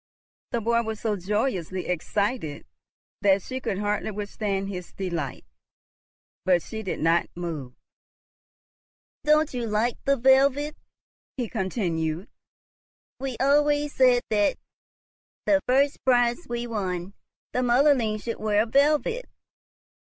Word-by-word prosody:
The 235 - -1
boy 235 +1 +2
was 220 -2 -4
so 215 -2 0
joyously 190 -2 -1
excited 180 - -2 0.6
that 195 -1 +4
she 260 0 -4
could 195 - -2
hardly 210 +1 -1
withstand 205 -1 -3
his 180 -3 -7
delight, 170 -8 -4 1.0
but 180 -2 +3
she 220 - -6
did 190 - -4
not 165 +2 +3
move. 155 -8 -5 1.5
"Don't 305 0 +4
you 240 -2 -2
like 220 +3 0
the 275 0 +3
velvet?" 275 +4 +4 0.6
he 245 -3 -1
continued. 180 -5 -2 0.9
"We 260 -3 -4
always 290 +1 +3
said 250 -2 +4
that, 205 -1 +2 0.9
the 295 -1 +4
first 275 +3 +2
prize 245 +3 +2
we 240 0 -2
won, 190 -5 -3 0.4
the - - +1
motherling 245 -3 +3
should 230 - -4
wear 215 0 +2
velvet. 300 - +2
220 Hz, 115 wpm, -26 LUFS, 190-260 Hz, 1.5 s, that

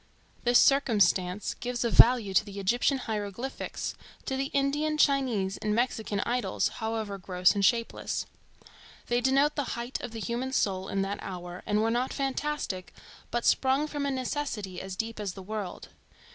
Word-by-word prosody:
This 240 0 +6
circumstance 205 -8 +3
gives 245 -1 -3
a 235 - +1
value 230 -5 +6
to 190 - +5
the 200 -1 -8
Egyptian 240 +7 +2
hieroglyphics, 220 +2 -4 0.3
to 265 - -2
the 270 +1 -1
Indian, 290 +3 0
Chinese 255 -10 +2
and 210 0 -1
Mexican 220 -4 0
idols, 240 -6 0
however 220 -3 -3
gross 180 -1 +3
and 200 - -1
shapeless. 230 +3 +1 0.8
They 240 0 +2
denote 275 +4 +3
the 285 -4 -2
height 240 +2 -4
of - - -5
the 225 0 -7
human 245 +4 -3
soul 190 -6 0
in 195 0 0
that 200 +1 -3
hour, 180 -1 -7
and 210 +1 +2
were 225 - +2
not 245 +2 0
fantastic, 275 -8 -3 0.3
but 240 0 -2
sprung 270 +3 +3
from 290 -2 -3
a - - +1
necessity 255 -8 -3
as 190 0 -6
deep 225 +2 -4
as 200 -3 -3
the 190 - -9
world. 205 -2 -5
230 Hz, 165 wpm, -29 LUFS, 200-265 Hz, 0.8 s, This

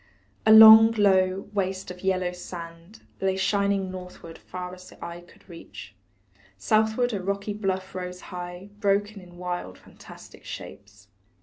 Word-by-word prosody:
A - - +7
long, 220 +1 +10
low 190 -3 +2
waste 190 -2 -3
of 180 0 -11
yellow 185 -1 0
sand 170 +1 -10 0.2
Lay 190 0 0
shining 200 -1 0
northward 180 -3 -10
far 180 0 -8
as 185 0 -13
eye 170 0 -9
could 175 - -22
reach, 170 -3 -12 0.6
Southward 220 +2 +1
a 200 - -3
rocky 200 +2 -3
bluff 190 -2 -3
rose 180 -1 -6
high 180 +2 -8
Broken 205 0 0
in 175 -1 -16
wild, 175 - -5
fantastic - - -15
shapes. 100 -1 -11
185 Hz, 135 wpm, -25 LUFS, 180-200 Hz, 0.6 s, long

